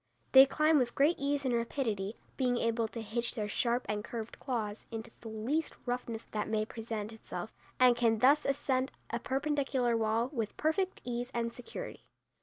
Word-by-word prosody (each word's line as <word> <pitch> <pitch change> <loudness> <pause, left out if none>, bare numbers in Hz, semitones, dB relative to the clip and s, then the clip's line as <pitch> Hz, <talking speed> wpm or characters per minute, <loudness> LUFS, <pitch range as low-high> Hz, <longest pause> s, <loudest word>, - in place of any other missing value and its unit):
They 265 0 +10
climb 305 +2 +4
with 240 -2 0
great 295 +5 +3
ease 280 0 0
and 255 - +2
rapidity, 230 -4 -1 0.2
being 250 -2 +1
able 230 -1 +1
to 225 +1 -6
hitch 235 +3 -2
their 215 -3 -1
sharp 240 +4 0
and 210 0 -1
curved 225 -1 -6
claws 220 -5 -3
into 225 0 -6
the 230 - -8
least 235 +9 -1
roughness 245 -2 -3
that 210 -1 -1
may 215 -1 +1
present 220 -1 -5
itself, 220 - -7 0.3
and 250 -1 +7
can 230 -2 +3
thus 275 +6 +5
ascend 265 -1 0 0.2
a 235 - -1
perpendicular 270 -2 0
wall 225 +2 +1
with 225 -5 -3
perfect 365 +5 0
ease 245 0 -2
and 235 0 -1
security. 250 - -7
240 Hz, 175 wpm, -32 LUFS, 225-270 Hz, 0.3 s, They